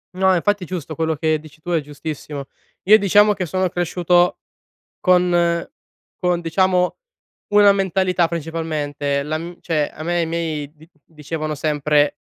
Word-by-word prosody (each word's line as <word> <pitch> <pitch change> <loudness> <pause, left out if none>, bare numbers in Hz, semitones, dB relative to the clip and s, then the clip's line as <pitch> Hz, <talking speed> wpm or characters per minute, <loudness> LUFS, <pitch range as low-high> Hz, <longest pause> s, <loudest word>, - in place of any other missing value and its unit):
No, 190 0 +3
infatti 205 +2 0
giusto 165 -3 -5
quello 160 +1 0
che 155 +1 0
dici 155 0 -16
tu 175 - -5
è 170 - +2
giustissimo. 145 -1 -7 0.4
Io 215 +3 +7
diciamo 205 +1 +4
che 190 -2 -3
sono 185 +2 -1
cresciuto 175 0 +1 0.6
con 175 -2 +2 0.5
con 180 -1 0
diciamo 180 +2 +1 0.6
una 205 -1 +7
mentalità 190 -2 +1
principalmente. 150 -4 -3
La 155 +2 -2
m 170 +2 -8
cioè, 155 -4 -1
a 155 - -9
me 175 +1 0
e - - +2
i - - 0
miei 160 -3 -3
di 155 +2 -18 0.2
dicevano 155 0 -5
sempre, 150 0 +1
165 Hz, 150 wpm, -20 LUFS, 155-180 Hz, 0.6 s, Io